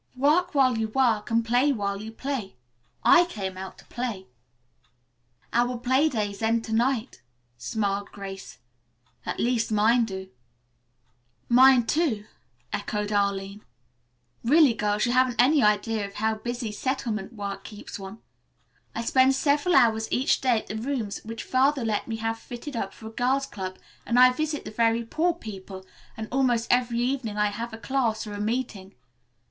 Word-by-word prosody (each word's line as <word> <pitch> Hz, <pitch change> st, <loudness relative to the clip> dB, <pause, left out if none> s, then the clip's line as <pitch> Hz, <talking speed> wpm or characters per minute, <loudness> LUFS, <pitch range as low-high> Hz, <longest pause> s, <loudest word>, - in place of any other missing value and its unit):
"'Work 300 Hz, +6 st, +2 dB
while 255 Hz, -4 st, +3 dB
you 220 Hz, -, 0 dB
work 225 Hz, -2 st, +1 dB
and 230 Hz, 0 st, +1 dB
play 245 Hz, +5 st, +3 dB
while 200 Hz, -5 st, -2 dB
you 220 Hz, +1 st, -7 dB
play.' 245 Hz, -, -4 dB, 0.5 s
I 350 Hz, -1 st, +7 dB
came 195 Hz, -, -5 dB
out 190 Hz, 0 st, -8 dB
to -, -, -17 dB
play." 230 Hz, -6 st, -4 dB, 1.3 s
"Our 245 Hz, +1 st, +1 dB
play 260 Hz, +5 st, +2 dB
days 205 Hz, -5 st, -3 dB
end 225 Hz, +1 st, +1 dB
to 220 Hz, -, -5 dB
night," 240 Hz, -, 0 dB, 0.4 s
smiled 200 Hz, -, -2 dB
Grace. 195 Hz, -1 st, -8 dB, 0.7 s
"At -, -, -3 dB
least 235 Hz, -2 st, 0 dB
mine 225 Hz, +3 st, +4 dB
do." 190 Hz, -3 st, -7 dB, 1.2 s
"Mine, 255 Hz, 0 st, +6 dB
too," 225 Hz, -4 st, 0 dB, 0.5 s
echoed 210 Hz, 0 st, -2 dB
Arline. 200 Hz, 0 st, -1 dB, 0.8 s
"Really, 285 Hz, +1 st, +5 dB
girls, 210 Hz, 0 st, 0 dB
you 240 Hz, -, 0 dB
haven't 255 Hz, -1 st, +2 dB
any 280 Hz, +4 st, +5 dB
idea 210 Hz, 0 st, +2 dB
of 200 Hz, 0 st, -7 dB
how 220 Hz, +1 st, 0 dB
busy 240 Hz, +1 st, -4 dB
settlement 230 Hz, -3 st, -3 dB
work 200 Hz, -2 st, -5 dB
keeps 210 Hz, -1 st, -9 dB
one. 195 Hz, +3 st, -9 dB, 0.7 s
I 230 Hz, -, -2 dB
spend 260 Hz, +3 st, +4 dB
several 295 Hz, +5 st, +2 dB
hours 225 Hz, -4 st, +4 dB
each 260 Hz, -, +2 dB
day 250 Hz, -3 st, +3 dB
at -, -, -18 dB
the 215 Hz, -, -5 dB
rooms 230 Hz, -3 st, -3 dB
which 225 Hz, +1 st, -6 dB
Father 265 Hz, 0 st, +2 dB
let 215 Hz, -2 st, -1 dB
me 225 Hz, -, -3 dB
have 225 Hz, 0 st, -3 dB
fitted 245 Hz, +4 st, -8 dB
up 195 Hz, -4 st, -3 dB
for 220 Hz, -, -13 dB
a 220 Hz, -, -7 dB
Girls' 260 Hz, +4 st, +1 dB
Club, 185 Hz, -5 st, -6 dB, 0.3 s
and 240 Hz, -, +1 dB
I 255 Hz, 0 st, +8 dB
visit 305 Hz, +2 st, -3 dB
the -, -, -6 dB
very 230 Hz, +1 st, +1 dB
poor 330 Hz, +8 st, 0 dB
people, 195 Hz, -, -9 dB, 0.3 s
and 220 Hz, 0 st, -5 dB
almost 245 Hz, -3 st, +1 dB
every 245 Hz, -1 st, +2 dB
evening 245 Hz, -4 st, -2 dB
I 210 Hz, 0 st, +2 dB
have 230 Hz, +3 st, -5 dB
a 225 Hz, -, -7 dB
class 230 Hz, -3 st, -1 dB
or 210 Hz, -, -7 dB
a 205 Hz, -, -4 dB
meeting. 215 Hz, -4 st, -3 dB
230 Hz, 165 wpm, -26 LUFS, 210-255 Hz, 1.3 s, I